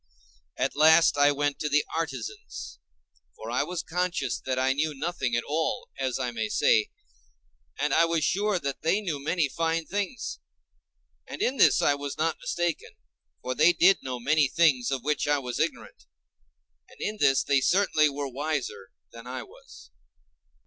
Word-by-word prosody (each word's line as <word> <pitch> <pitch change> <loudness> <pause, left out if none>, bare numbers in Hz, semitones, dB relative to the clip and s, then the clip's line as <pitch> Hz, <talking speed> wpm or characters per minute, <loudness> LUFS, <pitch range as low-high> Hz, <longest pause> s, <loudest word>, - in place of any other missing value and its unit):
At 130 +2 -1
last 160 +2 +6
I 145 0 +4
went 145 0 -1
to 150 - -2
the 150 +1 +2
artisans, 405 - -5 0.6
for - - -8
I - - +1
was 180 -1 -3
conscious 180 +1 -2
that 130 -1 -1
I 130 +1 +2
knew 150 +2 -1
nothing 135 -5 -2
at 120 - 0
all, 160 - -2
as 130 -2 -1
I 125 -2 -2
may 110 -2 -3
say, 110 0 +3 0.9
and 145 -1 0
I 165 - +5
was 165 -2 0
sure 205 +4 +1
that 140 -5 -4
they 165 +6 +2
knew 160 -9 -4
many 165 0 +1
fine 165 +3 -1
things; 205 +7 -4 0.9
and - - -8
in 275 -9 0
this - - +5
I 145 - +4
was 140 0 -5
not 160 +1 -1
mistaken, 175 - -2 0.5
for 130 - -2
they 160 +6 +5
did 190 +3 +4
know 125 -2 -5
many 150 +3 +2
things 135 -6 +2
of 135 -3 -3
which 150 +1 -1
I 145 0 +3
was 125 -3 -5
ignorant, - - -3 0.8
and - - -19
in 215 +1 -3
this 135 0 +3
they 140 -1 +2
certainly 160 -2 +3
were 140 0 -4
wiser 140 -7 -4 0.2
than 115 +1 -12
I 130 0 -5
was. - - -16
150 Hz, 170 wpm, -27 LUFS, 135-170 Hz, 0.9 s, last